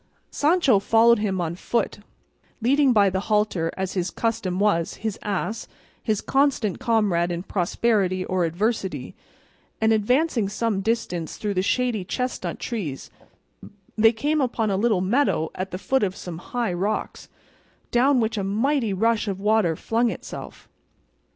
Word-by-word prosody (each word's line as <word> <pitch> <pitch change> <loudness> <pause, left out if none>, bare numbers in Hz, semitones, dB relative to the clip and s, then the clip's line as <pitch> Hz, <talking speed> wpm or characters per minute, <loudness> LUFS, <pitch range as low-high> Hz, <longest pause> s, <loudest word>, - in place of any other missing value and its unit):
Sancho 295 - +3
followed 225 +3 +4
him 195 -3 -1
on 170 -1 -2
foot, 210 +4 -2 0.6
leading 270 +3 +3
by 205 -4 +5
the 190 0 0
halter, 210 -6 +1
as 190 -1 -2
his 180 -1 -1
custom 195 -5 -2
was, 200 -5 +1
his 220 -2 -4
ass, 210 +2 -3 0.3
his 215 -3 -1
constant 270 -7 +1
comrade 210 -8 +1
in 175 0 -3
prosperity 185 0 0
or 185 -1 0
adversity; 190 +4 -2 0.7
and 220 0 +3
advancing 235 +1 +1
some 215 -1 -1
distance 190 -6 -2
through 210 -1 -2
the 185 - +1
shady 240 0 0
chestnut 250 +7 -3
trees 180 - -5 0.8
they 225 0 +5
came 295 +7 0
upon 230 -4 0
a - - +1
little 210 -2 +2
meadow 200 - +1
at 185 +1 -4
the 185 - -5
foot 265 +7 0
of 190 -2 0
some 170 -4 -7
high 235 0 -2
rocks, 200 +5 -3 0.6
down 260 +2 +4
which 220 -1 0
a - - -2
mighty 225 +3 0
rush 225 +3 +1
of 195 -2 -3
water 210 -5 +2
flung 230 +7 0
itself. 195 - -8
215 Hz, 150 wpm, -24 LUFS, 185-235 Hz, 0.8 s, by